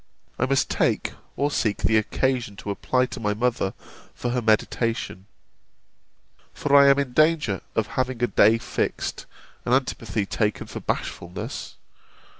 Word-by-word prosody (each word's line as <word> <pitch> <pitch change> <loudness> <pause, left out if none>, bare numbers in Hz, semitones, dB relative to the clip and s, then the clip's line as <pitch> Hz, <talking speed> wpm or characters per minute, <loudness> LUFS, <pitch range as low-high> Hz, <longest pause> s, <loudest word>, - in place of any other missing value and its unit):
I 130 - +2
must 135 0 +2
take - - 0 0.2
or 145 +1 +1
seek 105 -7 0
the 110 - +3
occasion 120 0 0
to 100 - -5
apply 125 +5 +1
to - - -7
my 105 -2 0
mother 115 -4 0 0.4
for 120 - -2
her 125 0 0
mediation; 110 -2 0 1.3
for 145 -1 +1
I 140 0 +8
am 140 0 +6
in 140 -3 -1
danger 155 - +3
of 110 - +2 0.2
having 125 -1 -3
a - - +7
day 110 0 +5
fixed, - - -3 0.4
and 125 - +3
antipathy 115 -6 -1
taken 105 +1 -1
for - - -7
bashfulness. 90 +1 -4
120 Hz, 145 wpm, -24 LUFS, 105-130 Hz, 1.3 s, I